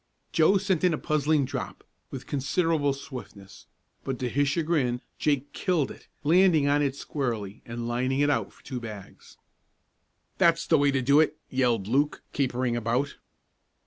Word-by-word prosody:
Joe 165 +5 +4
sent 190 -4 0
in 180 -3 +4
a - - -6
puzzling 155 -1 +1
drop, - - -6 0.3
with - - -7
considerable 145 +1 +1
swiftness, 110 -8 -10 0.4
but 135 -1 -3
to 125 0 -2
his 145 +3 +1
chagrin 145 -6 0 0.2
Jake 145 -2 0
"killed" 175 -7 0
it, - - -14 0.2
landing 165 -1 +4
on 145 +1 +3
it 140 -2 0
squarely 115 -9 -4
and 115 0 -5
lining 130 +3 0
it 145 - +3
out - - -1
for - - -23
two 130 -3 -5
bags. 105 -4 -10 1.0
"That's 165 -1 +4
the 160 - +3
way 145 0 +4
to 135 -2 0
do 140 +4 +5
it!" 155 -1 +2
yelled 120 -6 +1
Luke, 140 +6 +1
capering 125 -3 0
about. 120 +4 -1
140 Hz, 160 wpm, -27 LUFS, 125-155 Hz, 1.0 s, do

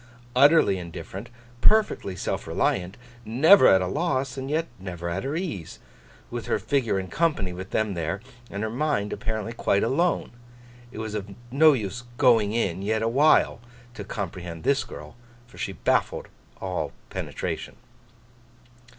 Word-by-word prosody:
Utterly 140 - +5
indifferent, 90 +5 -8 0.3
perfectly 215 - +3
self - - -3
reliant, 90 +1 0 0.3
never 140 - +6
at 95 -1 +6
a - - -1
loss, 135 - -1
and 135 0 -5
yet 160 +2 +1
never 90 -2 -6
at 95 +3 -2
her 140 +3 -2
ease, 160 - -4 0.5
with - - -5
her - - +2
figure 130 -8 0
in 95 - -5
company 120 - 0
with 95 +1 -7
them 110 -2 0
there, 85 +3 -2 0.3
and 100 +2 -4
her 110 - -1
mind 120 -5 0
apparently 110 +1 -3
quite 100 -3 +1
alone—it 120 -4 -3
was 110 -1 -4
of 100 -2 -5 0.2
no 155 +3 +6
use 110 -1 -3
'going 115 -7 +4
in' 95 -6 -1
yet 110 +2 0
awhile 130 +1 +4 0.3
to 105 - -7
comprehend 90 -5 -6
this 140 +5 +2
girl, - - -10 0.3
for 120 - -16
she - - -3
baffled - - 0 0.3
all 95 -2 -3 0.2
penetration. - - -4
110 Hz, 145 wpm, -26 LUFS, 95-135 Hz, 0.5 s, never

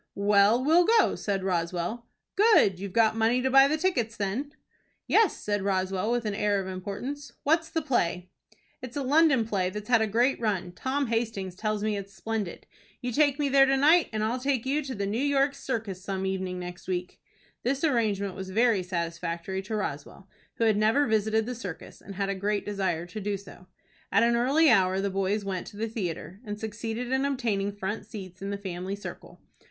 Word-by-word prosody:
"Well, 205 +4 +4
we'll 335 +4 +5
go," 455 0 +4
said 195 -2 -2
Roswell. 180 +5 -2 0.3
"Good! 405 - +5
You've 200 0 -5
got 220 +1 +3
money 225 +2 +2
to 265 - +1
buy 270 +1 +7
the 310 +2 0
tickets, 250 - 0
then?" 210 +9 -2 0.5
"Yes," 440 -6 +3
said 205 -1 -2
Roswell, 190 +1 0
with 240 -1 0
an 210 - -1
air 205 -1 +1
of 190 - -4
importance. 200 +10 -6
"What's 325 +2 +2
the 325 -1 -2
play?" 180 - -1 0.5
"It's 255 +1 -7
a 280 - -1
London 280 -3 +4
play 190 -4 0
that's 210 +4 -7
had 235 -2 +5
a 220 - +2
great 240 +6 +2
run. 195 -6 -1
Tom 265 +10 -1
Hastings 225 -5 -2
tells 215 +2 -2
me 215 -1 0
it 200 -1 -6
is 195 - -21
splendid. 210 0 -4 0.3
You 250 -2 -3
take 285 +1 +3
me 295 -2 0
there 270 0 +5
to 270 0 +3
night, 310 +5 +5
and 215 -1 -2
I'll 235 +4 -1
take 265 -2 0
you 285 +3 +1
to 265 - -5
the 200 -1 -2
New 215 +5 -1
York 280 0 +2
Circus 220 -9 -4
some 190 -1 -3
evening 190 -1 -2
next 180 0 -8
week." 180 -1 -4 0.4
This 275 +4 -1
arrangement 215 - +1
was 190 +1 -7
very 220 0 +3
satisfactory 170 +1 -3
to 215 +3 -5
Roswell, 185 0 -5 0.3
who - - -1
had 220 -2 +3
never 220 +7 +3
visited 220 -1 +1
the 250 - -3
circus, 200 -8 -8
and 200 - -10
had 195 0 -1
a - - +1
great 205 +2 -1
desire 190 -5 -1
to 180 +5 -7
do 200 0 -1
so. 185 -2 -14 0.4
At 200 +3 +4
an 235 0 +3
early 275 +7 +3
hour 190 -6 +4
the 200 0 -1
boys 195 +2 -1
went 190 -2 -3
to 205 - -11
the 225 +2 -2
theatre, 185 -4 -5
and 210 -2 -6
succeeded 225 +3 -4
in 265 +1 +2
obtaining 230 -8 0
front 205 +1 -5
seats 190 -4 -9
in 195 - -4
the 200 - -2
family 190 0 -5
circle. 205 - -10
210 Hz, 205 wpm, -27 LUFS, 190-250 Hz, 0.5 s, buy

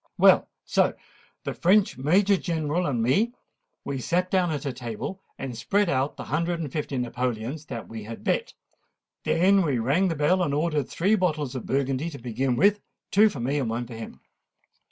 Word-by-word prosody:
Well, - - +6 0.2
so - - +2 0.5
the - - -3
French 195 +3 +3
Major 190 +9 +3
General 165 -1 -1
and 120 -5 0
me, 205 - +2 0.5
we 140 -1 -3
sate 180 +7 0
down 185 -2 +2
at 150 -3 -2
table, 125 - -5 0.2
and 130 -3 -5
spread 200 - +1
out 135 0 0
the - - -5
hundred 170 +3 -1
and 150 -5 -4
fifty 145 -2 -3
napoleons 125 +3 -3
that 115 - -6
we 115 -1 -7
had 115 +1 -8
bet. - - -1 0.7
Then 190 +3 +4
we 145 -6 +1
rang 140 +12 +2
the 165 - -1
bell, 155 +6 +2
and 145 -5 0
ordered 150 -3 0
three 195 +6 +1
bottles 155 - 0
of 130 - -6
Burgundy 135 +3 0
to 145 - -8
begin 125 +1 -1
with—two 205 - +2
for 145 - -7
me, 135 +5 0
and 125 -5 -1
one 120 +2 -2
for 120 - -10
him." 115 0 -9
145 Hz, 180 wpm, -26 LUFS, 125-180 Hz, 0.7 s, Well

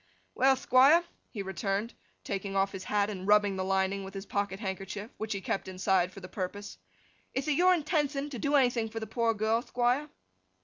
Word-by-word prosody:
'Well, 265 +1 +4
Thquire,' 265 +6 +5 0.3
he 205 -4 -5
returned, 195 +4 -2 0.3
taking 195 0 -4
off 195 0 +2
his 190 -1 -7
hat, 205 0 +1
and 190 -1 -6
rubbing 205 -1 +4
the 190 - -2
lining 190 +1 0
with 195 +1 -9
his 195 +1 -6
pocket 200 -1 -2
handkerchief, 195 +1 -5
which 220 0 -5
he 200 - -4
kept 195 - -2
inside 185 -1 +1
for 195 - -11
the 185 - -8
purpose. 200 - -6 0.6
'Ith 265 +3 -1
it - - +2
your 360 +5 +5
intenthion 295 -3 -1
to 250 - -5
do 285 +6 +1
anything 245 -4 +2
for 225 +1 -5
the 220 - -5
poor 230 +1 0
girl, 220 +2 +1
Thquire? 250 +5 0
210 Hz, 195 wpm, -30 LUFS, 195-255 Hz, 0.6 s, Thquire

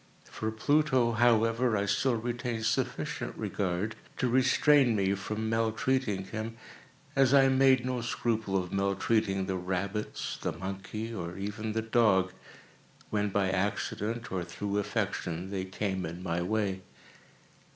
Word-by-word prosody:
For 110 - -3
Pluto, 130 +1 +2
however, 115 0 +3
I 100 - 0
still 125 +5 +2
retained 120 0 -3
sufficient - - -2
regard 95 +3 -2 0.2
to 130 - +1
restrain 130 0 +4
me 100 -1 +2
from 105 +3 -3
maltreating 115 -1 0
him, 110 +3 -5 0.6
as 135 0 +5
I 135 -1 +6
made 130 -1 +4
no 125 -1 -1
scruple 110 -4 -1
of 90 -1 -3
maltreating 100 0 +1
the 95 -1 -2
rabbits, 95 +4 -3
the - - -1
monkey, 95 +5 -5
or 90 -4 -5
even 105 +2 -4
the 110 0 -1
dog, 110 -5 +3 0.8
when 105 -1 +1
by 95 -1 +1
accident, 105 +3 -2
or 95 -2 -1
through 100 +4 -3
affection, 90 -2 -2
they 95 -2 -2
came 95 -1 -2
in 85 +3 -7
my 85 -1 -1
way. 95 0 -1
110 Hz, 135 wpm, -30 LUFS, 95-115 Hz, 0.8 s, I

